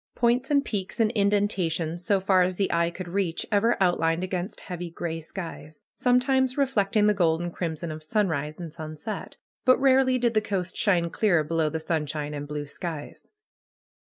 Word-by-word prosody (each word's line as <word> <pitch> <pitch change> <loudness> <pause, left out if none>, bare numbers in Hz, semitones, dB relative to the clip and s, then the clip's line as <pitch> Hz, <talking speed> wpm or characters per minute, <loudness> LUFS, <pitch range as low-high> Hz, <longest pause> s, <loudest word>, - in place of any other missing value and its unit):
Points 240 +2 +2
and 285 -1 +3
peaks 200 +2 -4
and 220 -1 +3
indentations, 190 -6 0
so 195 +2 +2
far 190 -1 +3
as 180 0 +1
the 195 +1 0
eye 170 0 +2
could 180 +1 -7
reach, 175 -2 -1
ever 220 +3 +3
outlined 175 -2 +2
against 185 +1 -4
heavy 175 -1 -6
gray 165 -1 -4
skies; 160 -3 -8
sometimes 255 +1 +2
reflecting 215 -6 +2
the 210 - +5
gold 165 -5 +2
and 175 0 -4
crimson 165 -1 -3
of 155 0 -7
sunrise 155 -4 -1
and 165 -3 -7
sunset. 155 +5 -6 0.3
But 255 -1 +5
rarely 265 -1 +4
did 240 -2 +1
the 215 - +3
coast 190 -4 -2
shine 175 -5 +2
clear 175 -7 +2
below 160 0 0
the 160 +1 -3
sunshine 150 -2 -2
and 145 0 -5
blue 150 0 -4
skies. 155 0 -7
180 Hz, 175 wpm, -26 LUFS, 160-210 Hz, 0.3 s, the